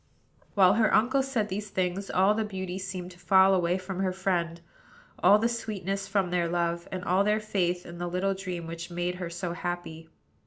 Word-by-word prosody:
While 190 -2 +6
her 220 0 +3
uncle 255 +5 +3
said 250 -6 -1
these 205 +2 -4
things, 185 +1 -2
all 190 +3 +4
the 220 +1 0
beauty 190 -3 -5
seemed 185 -1 -5
to 180 - -16
fall 190 +1 +5
away 180 -1 +2
from 185 0 -6
her 190 -1 +1
friend, 175 -3 -1 0.6
all 205 - +7
the 225 +2 +2
sweetness 195 -4 -3
from 195 -3 0
their 175 -1 +1
love, 170 0 -1
and 185 -1 -4
all 185 +3 +3
her 210 +1 +2
faith 180 -4 -1
in 170 0 -9
the 175 - -2
little 185 +2 0
dream 185 -3 -5
which 165 +1 -6
had 175 - -10
made 175 +1 -1
her 175 - -3
so 170 0 -4
happy. 175 -2 -5
185 Hz, 205 wpm, -28 LUFS, 175-200 Hz, 0.6 s, all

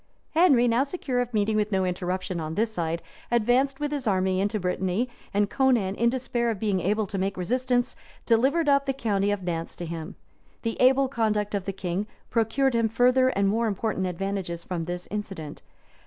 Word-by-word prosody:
Henry, 300 -8 +5
now 235 +2 +3
secure 275 -4 -1
of 245 0 -3
meeting 215 -1 +1
with 210 0 +1
no 190 -1 +2
interruption 180 0 -2
on 160 0 -4
this 220 +2 0
side, 165 -3 -2 0.3
advanced 245 +4 +2
with 295 0 -2
his 280 -5 -2
army 190 -1 +2
into 205 +2 0
Brittany; 185 +5 0 0.2
and 205 0 +2
Conan, 240 -7 +2
in 235 +3 +2
despair 245 -1 -1
of 225 - -1
being 205 -3 +1
able 210 +5 +1
to 195 0 -4
make 195 +1 -1
resistance, 245 +6 0 0.3
delivered 265 +8 +3
up 280 -1 +3
the 270 - +1
county 205 -6 0
of 205 -1 -1
Nantz 165 -2 -3
to 175 - -6
him. 165 +2 -6 0.5
The 230 -1 -1
able 265 +2 +5
conduct 215 -5 0
of 200 -2 -2
the 195 - -1
king 190 +1 -3 0.2
procured 240 +4 +2
him 230 -1 +2
further 250 +3 +4
and 200 -5 +1
more 225 +3 +1
important 200 -2 -1
advantages 185 -1 -3
from 170 -3 -3
this 175 +1 -5
incident. 195 -8 -5
210 Hz, 190 wpm, -26 LUFS, 185-245 Hz, 0.5 s, Henry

